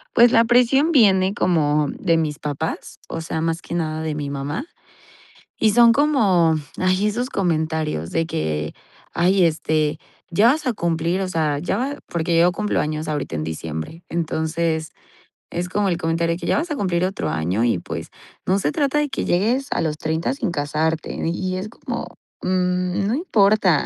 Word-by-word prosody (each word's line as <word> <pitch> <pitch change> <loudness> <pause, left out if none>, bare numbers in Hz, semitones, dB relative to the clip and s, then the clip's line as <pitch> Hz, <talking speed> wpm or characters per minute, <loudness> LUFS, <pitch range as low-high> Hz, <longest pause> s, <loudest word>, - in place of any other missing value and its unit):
Pues, 235 +1 +7
la 230 +1 +5
presión 250 +7 +4
viene 195 -7 +5
como 150 -6 +1
de 165 -4 +2
mis 150 -2 -1
papás, 150 +2 -4
o 165 - -4
sea, 160 0 -3
más 165 +1 -1
que - - -6
nada 155 -2 -2
de 155 -1 -2
mi 145 -1 -4
mamá. 145 - -4 0.9
Y 215 -1 +3
son 235 +1 +7
como, 205 - +3 0.2
ay, 185 +2 +2
esos 245 +5 -2
comentarios 160 - -1
de 165 0 0
que, 75 - -2 0.4
ay, 185 +2 +3
este, 155 -1 0 0.3
ya 200 +6 +4
vas 305 0 -4
a - - +2
cumplir, 170 -1 -1
o 190 - -2
sea, 155 -4 0
ya 150 - -1
va 280 +3 -2
porque 170 0 0
yo 175 +2 +5
cumplo 210 +3 -1
años 155 +1 -3
ahorita 150 - -3
en 75 - -2
diciembre. 80 - -6
Entonces, 160 0 -1 0.6
es 175 +1 -3
como 200 +1 0
el 175 - 0
comentario 165 0 0
de - - -9
que, - - -5
ya - - +2
vas 320 +1 -2
a - - 0
cumplir 180 -5 0
otro 190 +2 -1
año 90 +9 0
y, 115 -7 +1
pues, - - -6 0.4
no 190 +2 +2
se 150 -6 0
trata 290 0 +1
de 295 -1 0
que 275 - -3
llegues 235 +10 +1
a - - 0
los 155 -2 -1
30 160 +9 -1
sin 250 -8 -2
casarte. 155 +1 -1
Y 185 +3 -2
es 190 - -4
como, 220 - -6 0.3
mm, 180 +1 0
no 230 - +1
importa. 205 - +3
170 Hz, 185 wpm, -21 LUFS, 155-205 Hz, 0.9 s, Pues